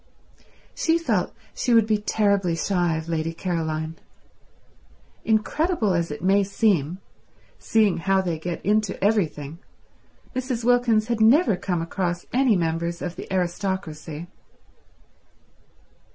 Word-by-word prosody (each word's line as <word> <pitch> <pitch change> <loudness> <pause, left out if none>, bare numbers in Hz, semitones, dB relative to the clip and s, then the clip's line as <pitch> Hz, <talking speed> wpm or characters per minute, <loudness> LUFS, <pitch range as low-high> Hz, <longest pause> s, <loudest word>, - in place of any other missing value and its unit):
She 330 0 +2
felt 335 - 0 0.2
she 240 - +1
would 225 -2 +5
be 215 -1 +1
terribly 200 -4 +1
shy 175 -2 0
of 160 0 -6
Lady 165 0 -2
Caroline. 160 -2 -3 1.3
Incredible 225 - +1
as 170 -1 0
it 150 - -7
may 195 +2 +4
seem, 190 -5 +1 0.6
seeing 215 -4 +2
how 195 +3 +2
they 175 -4 -2
get 170 +1 -5
into 210 0 +1
everything, 165 -7 0 0.8
Mrs. 255 -2 -2
Wilkins 240 -3 +3
had 235 -1 -1
never 235 - +5
come 175 -2 -2
across 175 0 -3
any 255 -3 +4
members 170 0 -1
of 175 -1 -4
the - - -9
aristocracy. 175 -4 -3
190 Hz, 120 wpm, -24 LUFS, 165-220 Hz, 1.3 s, would